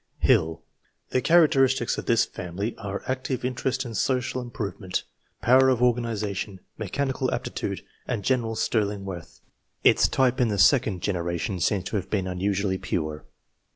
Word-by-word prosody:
HiLL. 80 0 +3 0.5
The 130 - +2
characteristics 135 -7 +4
of - - -8
this 115 -1 +4
family 95 +6 -5
are, 100 0 -5
active 130 -1 -2
interest 130 +1 -1
in 115 - -6
social 130 +2 0
improvement, 105 -6 -4 0.4
power 130 +2 +6
of 130 -3 +2
organization, 110 -5 -1 0.2
mechanical 130 +5 -2
aptitude, - - -3 0.2
and 115 -5 -2
general 115 -3 0
sterling 105 -3 0
worth. 90 -4 -8 0.4
Its - - +5
type 130 0 +2
in 120 - +4
the 105 -2 -1
second 100 -4 +4
generation 85 0 -2
seems 95 +3 +1
to 105 - -2
have 95 - -5
been 100 -3 0
unusually 95 +1 -1
pure. 75 -2 -3
110 Hz, 145 wpm, -26 LUFS, 95-125 Hz, 0.5 s, power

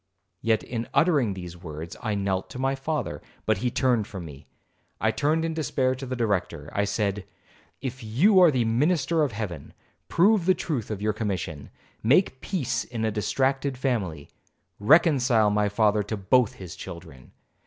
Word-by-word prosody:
Yet, 110 -1 +1
in 115 -1 -4
uttering 145 - +3
these 90 -2 -8
words, 80 -1 -8
I 110 -3 -1
knelt 95 -2 -1
to - - -8
my 135 +1 0
father, 135 -1 -3 0.2
but 110 -3 +1
he 125 - 0
turned 120 -4 +1
from 95 -4 -7
me. 70 -2 -12 0.5
I - - +2
turned 155 +3 +1
in 165 - -2
despair 130 -4 0
to 130 +1 -7
the 130 - -3
Director. 105 -7 -2
I 100 - +1
said, 100 -1 -1 0.6
'If 130 -1 -5
you 165 - +4
are 180 -2 +8
the 130 -5 +1
minister 155 +7 +2
of 145 -4 +1
Heaven, 95 -9 -6 0.3
prove 190 0 +3
the 185 - +5
truth 135 - -3
of 105 -2 -4
your 105 0 +1
commission,—make 105 - -1
peace 135 - -1
in 115 -2 -4
a 110 - +1
distracted 130 +5 0
family, 100 - -2 0.5
reconcile 125 - +4
my 105 0 +2
father 105 0 +2
to 105 +1 -4
both 115 +4 +3
his 90 -1 -9
children. 85 -8 -10
115 Hz, 165 wpm, -26 LUFS, 100-135 Hz, 0.6 s, are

